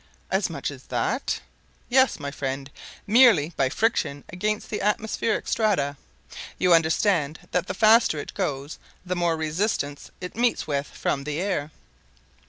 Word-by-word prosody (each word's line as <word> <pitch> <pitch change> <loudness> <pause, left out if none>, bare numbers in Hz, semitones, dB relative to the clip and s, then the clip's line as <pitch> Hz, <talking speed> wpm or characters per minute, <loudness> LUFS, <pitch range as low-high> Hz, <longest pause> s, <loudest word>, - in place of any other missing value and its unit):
"As - - +1
much - - -4
as - - -12
that?" - - -1 0.5
"Yes, 260 +1 +3
my 140 -1 -4
friend; 135 0 -4 0.3
merely 210 - +5
by 135 -1 +2
friction 145 - 0
against 210 +5 -2
the 210 - -2
atmospheric 215 +2 0
strata. 180 -11 +1 0.6
You 180 -1 +4
understand 165 -1 +2
that 180 0 0
the 185 - -3
faster 220 -5 +5
it 145 - -6
goes 145 -6 -3 0.3
the 180 0 -2
more 170 -2 +1
resistance 155 -2 -2
it 180 0 -7
meets 240 +1 +1
with 145 -1 -2
from 140 - -2
the 150 +2 -3
air." 180 -6 -1
175 Hz, 145 wpm, -25 LUFS, 145-210 Hz, 0.6 s, merely